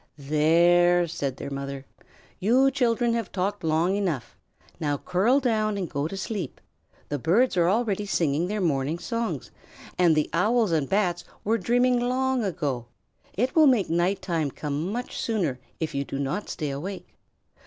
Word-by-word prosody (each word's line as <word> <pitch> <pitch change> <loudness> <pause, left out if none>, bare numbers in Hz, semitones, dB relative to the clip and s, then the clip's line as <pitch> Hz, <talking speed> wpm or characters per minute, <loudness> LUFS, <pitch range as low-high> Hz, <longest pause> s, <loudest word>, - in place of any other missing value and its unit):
"There!" 170 +4 +4
said 140 -5 -3
their - - -6
mother. 140 0 -5 0.5
"You 250 +7 +4
children 240 -3 +1
have 230 -5 -2
talked 200 +1 -2
long 165 +4 +2
enough. 180 - -2 0.4
Now 145 -2 0
curl 195 - +2
down 215 -5 0
and 185 -3 -2
go 145 0 -2
to 195 - -6
sleep. 195 - -4 0.5
The 145 - -2
birds 205 - +2
are 175 -1 +3
already 210 -1 0
singing 165 -2 +1
their 210 +1 -2
morning 150 -2 0
songs, 230 +5 -3 0.5
and 170 -3 +5
the 155 - +1
Owls 215 +3 +2
and 155 -4 0
Bats 180 -4 +1 0.2
were 225 +2 +1
dreaming 245 +1 +2
long 255 0 0
ago. 145 - -2 0.5
It 250 +6 0
will 315 -2 +7
make 230 -10 +3
night 180 +3 +1
time 165 -6 -1
come 150 +6 -3
much 245 +3 -4
sooner 175 - -1 0.2
if 160 - -3
you 140 - -1
do 135 - -5
not 140 +9 -3
stay 150 -2 -3
awake." 180 +8 -6
180 Hz, 165 wpm, -26 LUFS, 155-225 Hz, 0.5 s, will